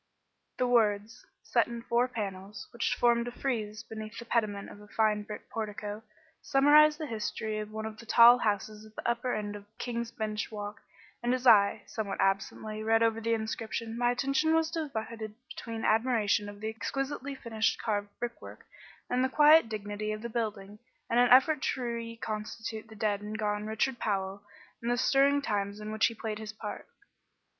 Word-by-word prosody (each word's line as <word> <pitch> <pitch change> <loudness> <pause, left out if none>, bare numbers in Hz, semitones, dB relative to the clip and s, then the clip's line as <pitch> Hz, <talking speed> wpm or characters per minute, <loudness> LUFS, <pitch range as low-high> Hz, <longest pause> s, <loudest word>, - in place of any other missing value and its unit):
The 250 - +2
words, 225 -1 +1 0.2
set - - +2
in 235 -1 -7
four 235 +2 +2
panels, 200 -3 -6
which 235 - 0
formed 235 0 +3
a - - -3
frieze 220 -4 -3
beneath 220 -1 -8
the 235 - -7
pediment 210 -4 -1
of 205 - -12
a 210 - -14
fine 215 0 +1
brick 210 0 -8
portico, 210 -1 -4 0.4
summarised 300 +2 +6
the 310 - -4
history 215 -2 -3
of 210 0 -5
one 220 0 -5
of 220 0 -7
the 230 - -12
tall 240 +1 +8
houses 210 0 -1
at 215 0 -16
the - - -4
upper 240 +1 0
end 210 -1 -4
of 205 0 -10
King's 235 -1 -3
Bench 215 -1 -3
Walk 205 -1 -6 0.4
and 240 +1 +1
as 255 0 -5
I, 205 -4 +6
somewhat 210 -3 -4
absently, 195 +2 -1
read 225 +1 +3
over 225 0 +1
the 230 0 +1
inscription, 225 +1 -4
my 240 0 +2
attention 275 +6 +2
was 325 0 +1
divided 230 -9 -4
between 225 -1 -5
admiration 220 -3 +2
of 205 0 -11
the 220 - -2
exquisitely 270 +4 -3
finished 225 -4 -1
carved 205 -2 -1
brickwork 240 -1 -7 0.4
and 250 +1 +1
the 260 - +2
quiet 300 -2 +6
dignity 210 0 -4
of 215 +1 -7
the 235 - -3
building, 210 -3 -4 0.3
and 235 - +4
an 245 0 +5
effort 270 +3 +6
to 260 - -1
reconstitute 230 -1 -5
the 220 - -13
dead 205 -1 0
and 210 +1 -5
gone 210 0 -1
Richard 230 +3 -1
Powell, 195 -1 -2 0.4
and 235 - -2
the 245 - +2
stirring 280 +2 +3
times 200 -2 -2
in 215 0 -6
which 220 0 +3
he 230 - -6
played 215 -1 -4
his 220 0 -6
part. 215 - -7
220 Hz, 185 wpm, -30 LUFS, 210-240 Hz, 0.4 s, tall